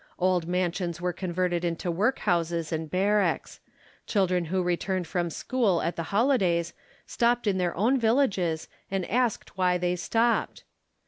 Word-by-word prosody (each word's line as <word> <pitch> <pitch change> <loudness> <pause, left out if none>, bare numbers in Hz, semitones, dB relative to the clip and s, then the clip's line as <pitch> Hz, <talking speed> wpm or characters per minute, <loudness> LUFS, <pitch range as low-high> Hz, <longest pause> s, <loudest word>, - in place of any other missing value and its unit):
Old 180 -2 +1
mansions 175 -1 -1
were 180 0 -1
converted 175 -1 -1
into 170 +1 -2
workhouses 170 -5 0
and 160 -1 -3
barracks: 200 +4 0 0.5
children 185 -4 +1
who 185 +3 -1
returned 180 +1 -1
from 175 +1 -1
school 200 - 0
at 170 - -1
the - - -3
holidays 195 -8 +2 0.3
stopped 240 0 +1
in 195 -3 +1
their 175 -2 0
own 245 +8 +3
villages, 210 - +1 0.2
and 190 -2 -2
asked 240 -4 -1
why 180 -1 +3
they 180 0 0
stopped. 230 +6 0
180 Hz, 140 wpm, -27 LUFS, 175-205 Hz, 0.5 s, own